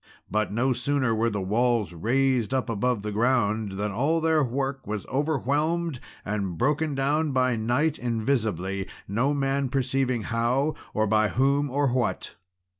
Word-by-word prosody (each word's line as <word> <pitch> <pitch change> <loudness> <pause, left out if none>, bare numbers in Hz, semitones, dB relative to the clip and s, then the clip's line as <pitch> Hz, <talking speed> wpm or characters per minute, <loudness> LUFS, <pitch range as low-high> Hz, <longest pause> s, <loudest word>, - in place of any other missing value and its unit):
But 110 0 0
no 125 +5 +1
sooner 130 -1 0
were 115 +1 +1
the 100 -3 -3
walls 115 0 +1
raised 130 +6 +1
up 125 -2 -1
above 115 0 0
the 105 - -3
ground 110 -2 +1
than 105 +2 -2
all 140 +10 +1
their 160 -1 +2
work 135 +1 -3
was 105 -2 -3
overwhelmed 150 +2 0 0.3
and 100 -5 -2
broken 150 - +1
down 145 +2 +1
by 130 -1 +2
night 125 +8 0
invisibly, 110 -6 -1 0.2
no 125 +9 +1
man 135 -1 0
perceiving 130 -2 0
how, 120 +7 0 0.2
or 110 - +2
by 110 0 +3
whom, 140 +5 +1
or 140 +1 +1
what. 120 -2 -1
125 Hz, 150 wpm, -26 LUFS, 110-140 Hz, 0.3 s, by